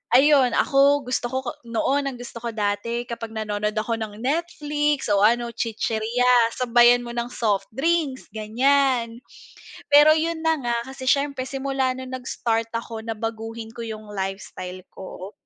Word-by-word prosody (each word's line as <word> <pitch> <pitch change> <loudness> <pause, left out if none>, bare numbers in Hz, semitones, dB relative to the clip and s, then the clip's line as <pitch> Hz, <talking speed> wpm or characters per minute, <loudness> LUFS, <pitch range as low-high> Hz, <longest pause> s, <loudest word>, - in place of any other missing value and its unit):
Ayun, 270 -2 +5
ako 280 +1 +4
gusto 250 - -1
ko 260 +2 -3 0.3
noon, 275 +5 0
ang 270 - -4
gusto 245 -1 -9
ko 230 0 -5
dati 215 +3 -1
kapag 230 -2 -7
nanonood 210 0 -2
ako 225 +2 -1
ng 215 -2 -5
Netflix 295 -1 -1
o 200 - +4
ano 235 +3 +3
chichirya 230 +1 +1
sabayan 240 0 +5
mo 240 - -7
ng 235 0 -3
soft 205 -5 -1
drinks 300 -2 0
ganyan. 235 +2 +1 0.7
Pero 295 +2 +7
yun 320 +1 0
na 320 -1 +2
nga 240 -2 -1
kasi 265 -1 -8
siyempre 280 -1 +1
simula 270 -1 -1
nung 260 0 -8
nag-start 230 -3 -2
ako 230 -1 -5
na 225 0 -4
baguhin 225 0 -5
ko 235 - -10
yung 215 -2 -7
lifestyle 190 -2 -5
ko, 190 +1 -9
240 Hz, 150 wpm, -23 LUFS, 220-270 Hz, 0.7 s, Pero